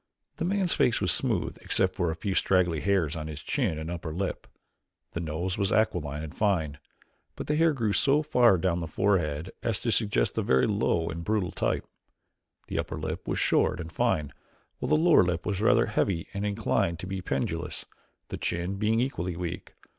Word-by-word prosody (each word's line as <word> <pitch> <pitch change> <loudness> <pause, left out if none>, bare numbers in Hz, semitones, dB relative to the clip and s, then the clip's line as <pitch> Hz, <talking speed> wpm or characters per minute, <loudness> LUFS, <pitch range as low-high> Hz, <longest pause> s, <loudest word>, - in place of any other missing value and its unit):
The - - -1
man's 190 -1 +1
face 115 - +2
was - - +2
smooth - - 0
except - - +1
for 85 - 0
a 80 - -2
few 95 +4 -3
straggly 90 -4 +2
hairs 85 -3 +1
on 80 -1 -5
his 75 -1 -6
chin 80 - 0
and 80 +2 -5
upper 85 -2 -5
lip. 90 +4 -3 0.6
The - - -4
nose 85 +4 -3
was 100 -1 +1
aquiline 80 -9 0
and 80 0 -7
fine, 85 -9 0 0.6
but - - -5
the 150 - 0
hair 165 +1 +4
grew 115 -8 0
so 145 +5 +3
far 125 -9 +4
down 95 +1 +1
on 85 - -1
the 85 - -4
forehead 85 -3 0
as 110 -4 0
to 115 - 0
suggest 100 - +1
a - - +2
very 65 0 +3
low 100 -6 +1
and 85 +1 -5
brutal 105 -2 0
type. - - -1 0.8
The - - -3
upper - - -3
lip - - -5
was - - -1
short - - +2
and 85 -1 -6
fine 75 -2 0 0.5
while - - -3
the 155 - +5
lower 165 +1 +6
lip 85 -1 -1
was 100 -2 -1
rather 115 +1 +4
heavy 95 -5 0
and 100 +1 -2
inclined 100 -5 0
to 85 - -7
be 95 0 -4
pendulous, 70 -6 -3 0.4
the - - -4
chin 90 +3 -2
being 110 +2 +2
equally 90 -9 -2
weak. 85 0 -5
90 Hz, 200 wpm, -28 LUFS, 80-110 Hz, 0.8 s, lower